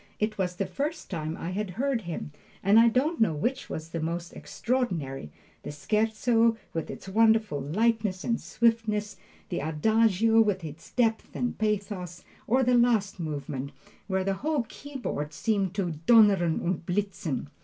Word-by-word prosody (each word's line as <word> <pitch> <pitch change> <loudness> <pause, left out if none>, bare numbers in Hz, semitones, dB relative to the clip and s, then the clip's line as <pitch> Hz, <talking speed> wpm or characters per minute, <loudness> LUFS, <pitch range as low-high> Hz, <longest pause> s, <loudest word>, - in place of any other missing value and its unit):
It 215 0 0
was 180 -1 -1
the 195 - -1
first 285 - -4
time 160 -2 -3
I 175 - -4
had 205 +1 -2
heard 270 -2 0
him, 170 -5 -5 0.3
and 200 +3 +6
I 230 - +7
don't 265 +7 +1
know 170 -8 +3
which 255 - -2
was 160 +1 -5
the 165 - -4
most 170 +2 -3
extraordinary 175 - -2 0.3
the - - -7
Scherzo, 225 - +2 0.2
with 165 - -3
its - - -8
wonderful 220 -6 +3
lightness 210 - 0
and 230 -1 0
swiftness, 220 -2 0 0.3
the 175 - -2
Adagio 220 +7 +3
with 205 -4 +1
its 155 +1 -9
depth 225 -3 0
and 245 - -1
pathos, 200 -5 -2 0.2
or 260 +3 +3
the 250 0 +3
last 235 -6 +3
movement, 145 -3 -4 0.3
where 190 -1 0
the 195 +1 0
whole 300 -3 +1
keyboard 245 - -5
seemed 195 0 0
to 190 -4 -1 0.2
"donnern 200 -8 +5
und 175 -1 -1
blitzen." 175 -7 -2
205 Hz, 155 wpm, -28 LUFS, 170-230 Hz, 0.3 s, I